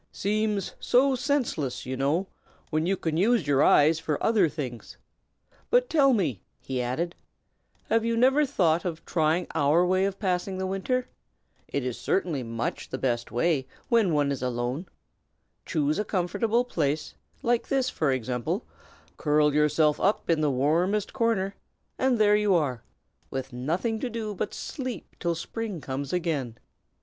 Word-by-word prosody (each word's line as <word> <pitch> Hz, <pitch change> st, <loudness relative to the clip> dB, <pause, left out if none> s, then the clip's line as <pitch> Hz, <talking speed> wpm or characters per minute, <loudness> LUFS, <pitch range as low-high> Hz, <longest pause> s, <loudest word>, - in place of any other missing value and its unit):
Seems 210 Hz, -1 st, -1 dB
so 265 Hz, +2 st, +3 dB
senseless, 255 Hz, -, -1 dB
you 130 Hz, +1 st, -3 dB
know, 145 Hz, +8 st, +1 dB, 0.5 s
when 155 Hz, +1 st, +1 dB
you 195 Hz, +1 st, +1 dB
can 160 Hz, -2 st, -2 dB
use 215 Hz, -1 st, +3 dB
your 140 Hz, -1 st, +3 dB
eyes 155 Hz, +2 st, +5 dB
for 150 Hz, -3 st, -1 dB
other 210 Hz, -7 st, +4 dB
things. 130 Hz, -7 st, -6 dB, 0.7 s
But, -, -, +3 dB
tell 280 Hz, -4 st, +5 dB
me," 160 Hz, -, 0 dB, 0.2 s
he 130 Hz, -1 st, -3 dB
added, 155 Hz, +8 st, -2 dB, 0.7 s
"have 225 Hz, 0 st, +1 dB
you 230 Hz, 0 st, 0 dB
never 265 Hz, +5 st, +4 dB
thought 175 Hz, -, +2 dB
of 165 Hz, -3 st, -5 dB
trying 160 Hz, +1 st, +1 dB
our 150 Hz, +5 st, +3 dB
way 185 Hz, +1 st, +2 dB
of 195 Hz, -1 st, -2 dB
passing 185 Hz, -1 st, -1 dB
the 190 Hz, -, -2 dB
winter? 195 Hz, +7 st, -1 dB, 0.6 s
It 140 Hz, -3 st, -2 dB
is 125 Hz, -2 st, -3 dB
certainly 175 Hz, -8 st, 0 dB
much 115 Hz, -1 st, -4 dB
the 130 Hz, -, -3 dB
best 120 Hz, -3 st, -1 dB
way, 135 Hz, +3 st, +1 dB, 0.2 s
when 225 Hz, -6 st, +4 dB
one 145 Hz, -2 st, +2 dB
is 140 Hz, -, -3 dB
alone. 125 Hz, +6 st, -2 dB, 0.8 s
Choose 155 Hz, -1 st, 0 dB
a -, -, +1 dB
comfortable 215 Hz, +5 st, 0 dB
place, 155 Hz, -, -1 dB, 0.3 s
like 240 Hz, -1 st, +1 dB
this, 270 Hz, -2 st, +1 dB
for 155 Hz, -4 st, +1 dB
example, 130 Hz, -, -2 dB, 0.5 s
curl 150 Hz, -1 st, +3 dB
yourself 150 Hz, 0 st, +3 dB
up 195 Hz, -3 st, +1 dB
in 160 Hz, -2 st, +2 dB
the 150 Hz, -, +2 dB
warmest 165 Hz, +10 st, +1 dB
corner, 225 Hz, -6 st, +1 dB, 0.5 s
and 260 Hz, -2 st, +2 dB
there 210 Hz, -1 st, +5 dB
you 210 Hz, -2 st, +3 dB
are, 135 Hz, -8 st, 0 dB, 0.5 s
with 130 Hz, -1 st, -5 dB
nothing 170 Hz, -, -1 dB
to 255 Hz, -, -2 dB
do 220 Hz, -2 st, -4 dB
but 200 Hz, -, -2 dB
to -, -, -9 dB
sleep 255 Hz, -, -6 dB
till 170 Hz, -1 st, 0 dB
spring 210 Hz, +2 st, -5 dB
comes 140 Hz, 0 st, -4 dB
again." 150 Hz, -10 st, -2 dB
170 Hz, 160 wpm, -27 LUFS, 145-215 Hz, 0.8 s, eyes